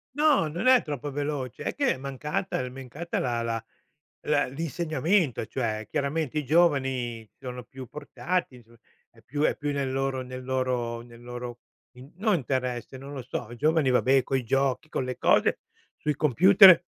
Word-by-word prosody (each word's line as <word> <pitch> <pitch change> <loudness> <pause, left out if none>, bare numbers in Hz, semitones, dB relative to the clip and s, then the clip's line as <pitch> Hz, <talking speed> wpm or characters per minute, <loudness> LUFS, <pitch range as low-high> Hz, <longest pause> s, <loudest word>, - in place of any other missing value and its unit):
No, 295 - +4
non 170 +9 -4
è 255 -2 +7
troppo 145 -2 -5
veloce; 140 -3 -3
è - - -3
che 280 -2 +2
è - - -8
mancata 140 +6 -3
l - - -3
è - - -5
mancata 135 +6 -5
la 120 -2 -1
la 115 -1 -2 0.6
la 150 -1 +3
l'insegnamento, 160 - 0
cioè 110 -4 -2
chiaramente 150 +1 -1
i 150 - -1
giovani 130 -8 +1
sono 125 -2 -7
più 130 +2 -10
portati, 150 -2 -3
so 115 +1 -21 0.3
è 115 - -22
più 145 0 -4
è - - +2
più 145 -1 -2
nel 140 -2 -1
loro 135 0 -1
nel 130 0 -7
loro 125 -2 -1
nel 120 0 -14
loro 120 0 -7 0.4
in 130 +4 -13
no 215 +3 +1
interesse, 130 -4 -2
non 135 +2 -9
lo 135 - -5
so. 125 -2 -4
I 120 - -9
giovani, 155 0 +3
vabbè, 130 +1 +4
coi 130 -1 -1
giochi, 135 +4 +1
con 135 - -2
le 125 0 -4
cose, - - +3 0.4
sui 150 -2 -1
computer 185 - +7
135 Hz, 175 wpm, -27 LUFS, 125-150 Hz, 0.6 s, è